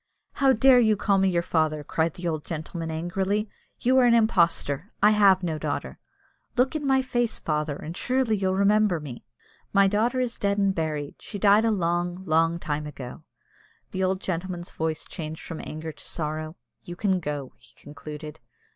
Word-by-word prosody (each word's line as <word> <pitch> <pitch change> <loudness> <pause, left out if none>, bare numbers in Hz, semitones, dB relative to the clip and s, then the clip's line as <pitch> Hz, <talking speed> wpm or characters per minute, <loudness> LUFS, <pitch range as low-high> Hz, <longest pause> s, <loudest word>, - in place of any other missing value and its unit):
"How 270 -1 +3
dare 260 +1 +6
you 220 -3 +3
call 195 0 +2
me 195 0 +3
your 170 -2 +1
father?" 155 -3 0
cried 160 +2 -1
the 175 -1 -4
old 155 -2 -2
gentleman, 165 +1 -5
angrily. 190 +6 -1 0.3
"You 260 +2 +4
are 250 - +5
an 235 -1 +5
impostor. 180 - +2
I 210 +1 +6
have 195 -3 +5
no 160 -3 -2
daughter." - - -4 0.6
"Look 260 +5 +2
in 295 -2 -2
my 265 -1 +3
face, 240 -3 0
father, 150 -1 -2
and 160 +4 -7
surely 250 0 +1
you'll 190 -2 0
remember 200 -2 +3
me." 140 -6 -9 0.5
"My 200 0 +6
daughter 225 +6 +1
is 245 -2 -2
dead 200 0 +1
and 195 -1 +2
buried. 155 -4 -3
She 205 - -7
died 205 +2 +5
a - - +3
long, 175 -2 -1
long 165 0 +2
time 150 -2 -3
ago." 130 -4 -8 0.7
The 190 - -2
old 190 0 0
gentleman's 175 -1 -4
voice 160 -1 -3
changed 160 -2 -7
from 165 - -6
anger 155 +1 -6
to - - -12
sorrow. 155 0 -4 0.3
"You 175 - -8
can 190 -1 +1
go," 145 -5 -5
he - - -17
concluded. 150 +1 -9
180 Hz, 180 wpm, -26 LUFS, 155-210 Hz, 0.7 s, dare